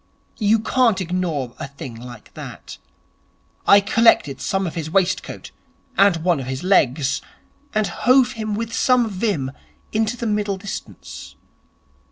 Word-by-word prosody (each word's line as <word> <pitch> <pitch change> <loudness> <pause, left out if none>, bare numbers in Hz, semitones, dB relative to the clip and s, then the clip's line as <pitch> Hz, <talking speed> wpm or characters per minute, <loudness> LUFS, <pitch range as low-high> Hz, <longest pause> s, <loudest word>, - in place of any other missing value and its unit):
You 215 0 +4
can't 230 -1 +2
ignore 170 -8 -2
a - - -4
thing 135 -3 -9
like 120 -1 -11
that. - - -9 0.9
I 200 - +8
collected 200 -10 +3
some 195 0 0
of 170 - -4
his 160 -3 -4
waistcoat 185 +1 -1 0.4
and 195 -5 +4
one 175 -4 +2
of 130 - -6
his 130 +3 -4
legs, 140 -6 +2 0.5
and 215 0 +2
hove 250 +4 +3
him 215 -3 -3
with 225 +1 -4
some 250 0 +3
vim 190 - -1 0.4
into 220 +2 0
the 235 - -4
middle 210 -2 0
distance. 195 +1 -8
195 Hz, 140 wpm, -21 LUFS, 145-220 Hz, 0.9 s, I